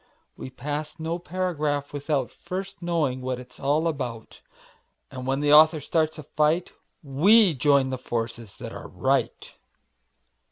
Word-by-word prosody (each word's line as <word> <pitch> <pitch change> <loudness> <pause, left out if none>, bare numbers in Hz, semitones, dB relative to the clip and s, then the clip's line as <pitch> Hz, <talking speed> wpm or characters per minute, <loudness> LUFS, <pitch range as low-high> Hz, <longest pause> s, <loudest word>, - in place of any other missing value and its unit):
We - - -8
pass 150 +5 -5
no 165 +2 -3
paragraph 155 -6 -2
without 145 -2 -1
First 195 +1 -7
knowing 160 -7 0
what 130 -1 -3
it's 125 0 -14
all 150 +4 +1
about, 125 -8 -5 0.7
And 130 -1 -7
when 135 +1 0
the 145 0 +3
author 155 +1 +7
starts 155 +2 0
a 155 - -8
fight 155 +4 0 0.3
We 180 +8 +5
join 140 -1 +3
the 130 - -3
forces 115 -3 -5
that - - -7
are - - -8
right. - - -1
145 Hz, 145 wpm, -25 LUFS, 130-160 Hz, 0.7 s, author